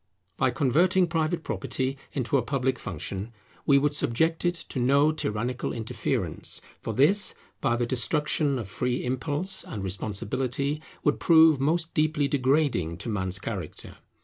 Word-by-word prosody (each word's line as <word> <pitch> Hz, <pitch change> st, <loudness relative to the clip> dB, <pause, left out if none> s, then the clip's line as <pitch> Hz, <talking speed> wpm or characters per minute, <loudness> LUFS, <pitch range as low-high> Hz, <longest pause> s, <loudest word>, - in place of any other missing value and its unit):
By -, -, +2 dB
converting 170 Hz, -, +3 dB
private 165 Hz, 0 st, -1 dB
property 130 Hz, +1 st, -2 dB, 0.2 s
into 130 Hz, -1 st, -1 dB
a 135 Hz, -, +4 dB
public 130 Hz, 0 st, -1 dB
function, 95 Hz, +5 st, -5 dB, 0.4 s
we 140 Hz, -, +6 dB
would 145 Hz, +1 st, +2 dB
subject 160 Hz, +5 st, +1 dB
it 175 Hz, 0 st, +1 dB
to 130 Hz, -, -3 dB
no 140 Hz, +5 st, +4 dB
tyrannical 125 Hz, -3 st, -2 dB
interference; 115 Hz, -2 st, -2 dB, 0.2 s
for 110 Hz, -, -4 dB
this, 165 Hz, -, +3 dB, 0.2 s
by 120 Hz, -4 st, +1 dB
the 120 Hz, 0 st, 0 dB
destruction 140 Hz, +4 st, +1 dB
of 115 Hz, -5 st, -5 dB
free 125 Hz, +5 st, -2 dB
impulse 145 Hz, +9 st, 0 dB
and 100 Hz, -, -6 dB
responsibility, 120 Hz, +9 st, -2 dB, 0.2 s
would 145 Hz, -, +2 dB
prove 160 Hz, -3 st, +6 dB
most 160 Hz, +4 st, 0 dB
deeply 155 Hz, -2 st, +2 dB
degrading 130 Hz, -, +1 dB
to 100 Hz, +6 st, -5 dB
man's 95 Hz, -3 st, -1 dB
character. 95 Hz, -5 st, -6 dB
135 Hz, 145 wpm, -27 LUFS, 115-155 Hz, 0.4 s, we